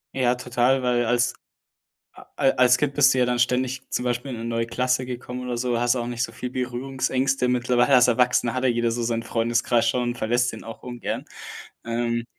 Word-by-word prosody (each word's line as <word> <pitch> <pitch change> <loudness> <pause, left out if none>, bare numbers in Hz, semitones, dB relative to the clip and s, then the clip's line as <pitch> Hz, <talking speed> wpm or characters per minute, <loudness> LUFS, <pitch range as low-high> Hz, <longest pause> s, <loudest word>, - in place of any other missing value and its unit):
Ja, 125 -2 +2
total, 125 +1 +1
weil 120 -1 +1
als 120 +1 +1 0.8
a - - -15
al 135 - +3
als 125 0 +4
Kind 145 0 -1
bist 145 -2 +4
du 130 - 0
ja 125 - +4
dann 125 0 -1
ständig 125 +1 0
zum 125 - -2
Beispiel 125 +2 -2
in - - -5
'ne 115 - -6
neue 115 0 -1
Klasse 125 +1 0
gekommen 125 0 -6
oder 120 -1 -3
so, 120 -1 -1
hast 120 +1 +2
auch 120 -1 -2
nicht 120 -1 -3
so 115 - -2
viel 115 +2 -6
Berührungsängste. 130 +1 -1
Mittlerweile 125 +2 +2
als 125 -1 +6
Erwachsener 125 -1 +2
hat 130 - -2
ja 130 - +4
jeder 120 -1 +1
so 120 +1 -2
seinen 115 0 -1
Freundeskreis 115 0 +1
schon, 120 0 0
verlässt 120 +1 0
den - - -9
auch 115 -1 -10
ungern. 120 -1 -5 0.6
Ähm 115 0 -1
125 Hz, 210 wpm, -24 LUFS, 120-125 Hz, 0.8 s, als